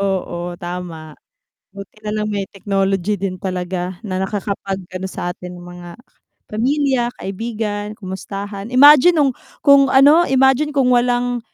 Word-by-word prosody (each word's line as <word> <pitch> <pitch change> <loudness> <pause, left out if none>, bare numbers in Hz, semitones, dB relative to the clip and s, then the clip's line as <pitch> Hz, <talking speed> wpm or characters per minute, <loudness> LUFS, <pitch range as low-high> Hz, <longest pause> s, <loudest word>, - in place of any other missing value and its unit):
Oo, 175 -3 -3
tama 175 -4 -7 0.6
buti 200 +2 -12
na 210 - -3
lang 210 0 -2
may 205 -2 -2
technology 195 0 -1
din 185 -1 -4
talaga 180 -1 -4
na 185 -3 -3
nakakapag-ano 190 -2 -4
sa 175 -1 -4
atin 180 0 -10
ng 175 - -11
mga 175 0 -10 0.6
pamilya, 260 +2 +1
kaibigan, 210 0 -4
kamustahan. 200 +1 -7
Imagine 295 +5 +8
nung, 285 -4 +3 0.3
kung 280 -2 +6
ano 290 +6 +5
imagine 265 +3 +2
kung 260 -2 +3
walang 245 0 +1
205 Hz, 130 wpm, -19 LUFS, 185-245 Hz, 0.6 s, Imagine